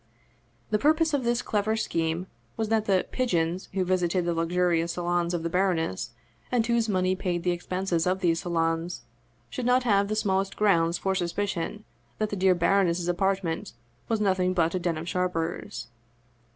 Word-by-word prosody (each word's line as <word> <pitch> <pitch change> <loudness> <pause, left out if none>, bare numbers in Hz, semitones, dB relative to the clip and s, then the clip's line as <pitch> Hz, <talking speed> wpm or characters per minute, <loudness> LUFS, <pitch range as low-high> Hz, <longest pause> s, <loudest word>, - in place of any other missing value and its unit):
The 210 - +2
purpose 315 +4 +3
of 280 -3 +1
this 240 +1 +1
clever 215 +1 0
scheme 165 -4 -1 0.3
was 220 -1 -1
that 220 -1 +2
the 190 -3 +2
" - - -31
pigeons 180 -8 0
" - - -33
who 190 -1 0
visited 180 -1 +1
the 175 - +1
luxurious 170 0 +1
salons 175 0 0
of 165 - -3
the - - 0
baroness, 175 - 0 0.4
and 240 -3 +2
whose 235 -1 +1
money 185 -1 +1
paid 180 -2 -2
the 180 - +2
expenses 180 -1 -1
of 185 +1 +1
these 170 -3 +2
salons, 165 -4 -1 0.5
should 245 - -3
not 250 +1 +4
have 200 -4 +3
the 215 - -1
smallest 195 -2 0
grounds 170 -5 +3
for 190 +2 0
suspicion 190 +2 -2 0.3
that 215 -1 -1
the - - -1
dear 190 -1 +3
baroness's 175 -1 +2
apartment 185 -2 -1 0.3
was 225 -1 0
nothing 185 -2 +1
but 165 -2 +2
a 185 - 0
den 170 -2 -1
of 160 +2 -6
sharpers. 180 -8 -2
185 Hz, 180 wpm, -27 LUFS, 170-205 Hz, 0.5 s, not